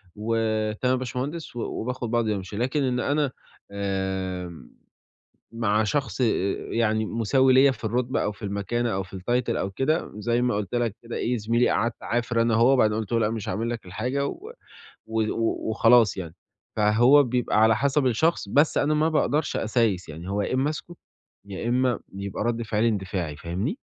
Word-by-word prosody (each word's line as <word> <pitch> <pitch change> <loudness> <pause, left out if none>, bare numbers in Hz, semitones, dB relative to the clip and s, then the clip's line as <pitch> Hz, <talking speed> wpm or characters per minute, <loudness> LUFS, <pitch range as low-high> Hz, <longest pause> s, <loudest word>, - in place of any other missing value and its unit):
"وتمام 110 +2 0
يا 130 - 0
باشمهندس." 130 +5 -5
و 120 - -4
وباخد 125 0 -4
بعضي 115 -3 +1
وامشي، 100 +1 -6
لكن 130 +5 0
إن 125 -2 0
أنا 145 -1 0 0.4
آمم، 95 -6 -4 0.8
مع 110 -2 +1
شخص 135 +3 -2
أأ - - +4 0.5
يعني 110 -1 +1
مساوي 130 +4 +2
ليَّ 135 +1 +6
في 115 -2 -12
الرُتبة 125 +4 0
أو 105 - -1
في 105 - -18
المكانة 105 +4 -1
أو 95 - -1
في 95 0 -10
الtitle 120 +6 -1
أو 95 - -2
كده 135 - -1
زي 120 +3 0
ما 125 -2 +1
قُلت 105 +1 -3
لك 115 -3 0
كده 115 0 -6
إيه، 125 +1 0
زميلي 115 +2 +1
قعَدت 115 +1 0
اعافر 115 0 0
أنا 115 -1 +2
وهو 120 +4 +5
وبعدين 110 -5 +3
قُلت 110 0 -5
له: 115 - +3
"لأ 105 - +1
مش 110 -3 -4
هاعمل 110 +5 -2
لك 115 -5 -5
الحاجة." 130 +10 -2
و 425 - -7 0.6
و 110 0 -1 0.5
وخلاص 115 -2 +4
يعني. 85 -3 -6 0.4
فهو 120 +7 +5
بيبقى 120 -3 +1
على 110 0 +5
حسب 140 +2 +1
الشخص، 130 -2 +1
بس 145 +7 +3
أنا 150 +1 +2
ما 155 +2 +2
باقدرش 150 0 0
أسايس 110 -7 0
يعني، 85 +5 -8
هو 100 +1 0
يا 100 - -2
إمّا 135 +3 +1
اسكت، 170 +3 -7 0.5
يا 100 +4 -4
إمّا 125 -1 +1 0.2
يبقى 100 +1 -4
رد 120 0 -1
فعلي 110 +1 +1
اندفاعي، 95 -7 -2
فاهمني؟ 90 - -3
115 Hz, 180 wpm, -25 LUFS, 105-125 Hz, 0.8 s, ليَّ